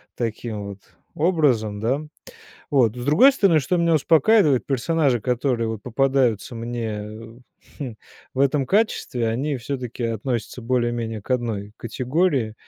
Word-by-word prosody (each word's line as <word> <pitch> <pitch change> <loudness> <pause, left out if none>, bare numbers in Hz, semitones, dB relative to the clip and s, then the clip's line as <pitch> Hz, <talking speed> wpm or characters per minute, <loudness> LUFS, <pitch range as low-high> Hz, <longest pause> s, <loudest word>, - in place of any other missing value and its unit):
таким 110 -2 -4
вот 100 -1 -8 0.4
образом, 135 - +1
да. 130 +7 0 0.7
Вот, 125 -5 +3
с 120 - -5
другой 245 - +6
стороны, 185 - +4
что 180 +6 0
меня 170 -1 +2
успокаивает- 155 - +4
персонажи, 135 -2 +1
которые 125 -1 0
вот 110 -2 -5
попадаются 130 -2 +1
мне, 115 -2 -4 0.8
хм, 125 -7 -5 0.4
в 135 - -3
этом 140 0 +2
качестве, 130 - 0
они 135 +5 -1
всё-таки 125 -1 -5
относятся 115 +1 -3
более-менее 120 -2 -1
к 100 - -18
одной 110 -5 -2
категории. 125 - 0
125 Hz, 130 wpm, -23 LUFS, 115-145 Hz, 0.8 s, другой